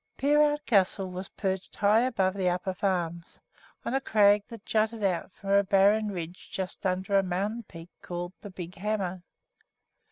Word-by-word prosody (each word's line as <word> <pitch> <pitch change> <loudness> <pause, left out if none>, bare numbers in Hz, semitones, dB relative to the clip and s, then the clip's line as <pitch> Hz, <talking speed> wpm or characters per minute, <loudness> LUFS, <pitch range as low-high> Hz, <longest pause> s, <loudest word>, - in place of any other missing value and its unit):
Peerout 295 +1 +3
Castle 195 -2 +2
was 185 +1 -6
perched 190 -2 -3
high 210 +2 +4
above 225 -7 +1
the 190 -2 +1
Upper 180 +1 -2
Farms, 175 -3 -2 0.5
on - - -2
a 270 - +1
crag 205 -3 +4
that 230 -4 -11
jutted 220 0 0
out 185 -1 0
from 195 +1 -6
a 200 0 +5
barren 200 +2 +4
ridge 175 -2 -7
just 190 +1 -3
under 190 +2 +1
a - - +4
mountain 195 +5 -2
peak 165 -5 -12
called 175 0 -5
"The 205 - -8
Big 180 -2 -8
Hammer." 190 -2 -2
195 Hz, 165 wpm, -28 LUFS, 185-215 Hz, 0.5 s, a